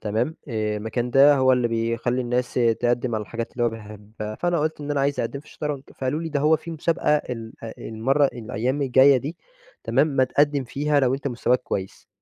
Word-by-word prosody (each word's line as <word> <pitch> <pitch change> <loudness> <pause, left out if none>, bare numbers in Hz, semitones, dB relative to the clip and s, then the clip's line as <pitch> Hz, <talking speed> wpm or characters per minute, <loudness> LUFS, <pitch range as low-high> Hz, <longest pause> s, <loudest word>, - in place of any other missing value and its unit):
تمام؟ 110 +9 -1
آآ 110 -3 -1
المكان 120 +3 -3
ده 140 +3 +7
هو 130 -1 +4
اللي 125 -2 +2
بيخلّي 115 +2 -1
الناس 125 +1 -1
تقَدّم 120 0 +1
على 110 - -1
الحاجات 115 +3 -6
اللي 120 -1 -1
هو - - +4
بيحبها، 105 0 -8
فأنا 175 +6 0
قُلت 155 0 -2
إن 145 0 -5
أنا 145 -1 +1
عايز 140 +1 0
أقدّم 140 - -3
في 150 - -23
الشطرنج، 150 -3 -5
فقالوا 135 +4 -2
لي: 165 - -3
"ده 145 -2 -1
هو 155 +2 +4
في 160 +2 -9
مسابقة 160 -1 +1
ال 115 -5 -6
آآ، 115 - -7
المَّرة 130 +6 +1
الأيام 120 +3 -3
الجايّة 135 +1 +6
دي" 145 +6 -4 0.5
تمام؟ - - +3
"ما 135 -3 +2
تقدّم 145 +1 +1
فيها 145 +4 0
لو 130 -1 +2
أنتَ 140 +1 -3
مستواك 125 0 0
كويس." 95 -1 -5
130 Hz, 205 wpm, -24 LUFS, 115-145 Hz, 0.5 s, ده